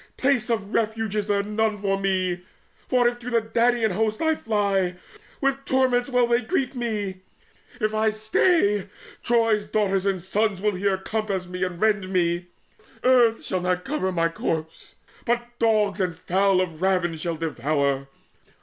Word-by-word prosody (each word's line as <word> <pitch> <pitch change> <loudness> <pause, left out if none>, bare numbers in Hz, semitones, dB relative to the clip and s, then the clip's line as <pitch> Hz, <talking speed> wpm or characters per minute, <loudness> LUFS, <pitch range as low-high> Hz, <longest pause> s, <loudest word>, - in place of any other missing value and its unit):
Place 260 -3 +1
of 220 -3 -2
refuge 220 -1 -1
is 210 -1 -1
there 200 -1 +1
none 215 +1 0
For 195 -1 0
me; 185 -2 0 0.5
for 250 -2 +3
if 240 0 -1
to 240 +1 -6
the 235 -1 +3
Danaan 230 0 +1
host 215 +3 0
I 320 -1 +2
fly, 200 - 0 0.5
With 275 0 0
torments 260 -1 +1
will 250 -2 +3
they 235 +1 +2
greet 250 +3 -1
me. 210 -6 -3 0.6
If 215 -1 0
I 220 0 +2
stay, 215 - +2 0.3
Troy's 225 -3 +2
sons 195 -3 +1
and 190 -1 -2
daughters 210 -1 +1
here 195 -1 +1
will 190 - -17
compass 210 -4 -2
me 180 +1 -4
And 180 -2 -3
rend 210 -3 +1
me. 175 -1 0 0.6
Earth 245 -3 +4
shall 185 -2 -1 0.2
cover 230 +2 -3
not 185 - -2
my 165 -1 +2
corpse, 160 -1 -4 0.3
But 240 0 0
dogs 215 -3 +2
and 180 -3 -1
fowl 190 +1 +2
of 165 -3 -4
ravin 180 -3 +1
shall 165 +1 -3
devour. 140 -3 -1
210 Hz, 160 wpm, -24 LUFS, 185-230 Hz, 0.6 s, Earth